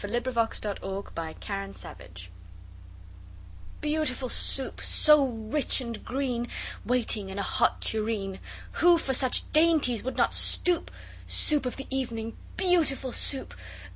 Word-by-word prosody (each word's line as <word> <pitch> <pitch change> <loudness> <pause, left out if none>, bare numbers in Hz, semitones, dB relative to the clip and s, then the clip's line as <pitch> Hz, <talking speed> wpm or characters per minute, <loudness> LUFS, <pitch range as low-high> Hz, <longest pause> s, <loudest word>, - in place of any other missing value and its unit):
] - - -11
Lewis 240 +4 -2 0.2
Carroll 195 -1 -4
Beautiful 195 +5 -6
Soup 90 +1 -11 1.5
BEAUTIFUL 295 -4 -1
Soup, 265 +2 -1
so 300 -2 +6
rich 230 +5 -1
and 235 -3 -6
green, 250 -2 -2 0.4
Waiting 225 -5 0
in 190 - -7
a 200 - -1
hot - - +1
tureen! 215 -3 -1 0.4
Who 345 0 +6
for 275 -5 -2
such 255 -1 +2
dainties 305 -7 +3
would 260 - -4
not - - +2
stoop? 355 -2 +2 0.4
Soup 295 -4 +4
of 250 - -4
the 270 - -7
evening, 230 -4 -3 0.2
beautiful 320 -8 +1
Soup! 270 - +1
250 Hz, 125 wpm, -27 LUFS, 210-280 Hz, 1.5 s, so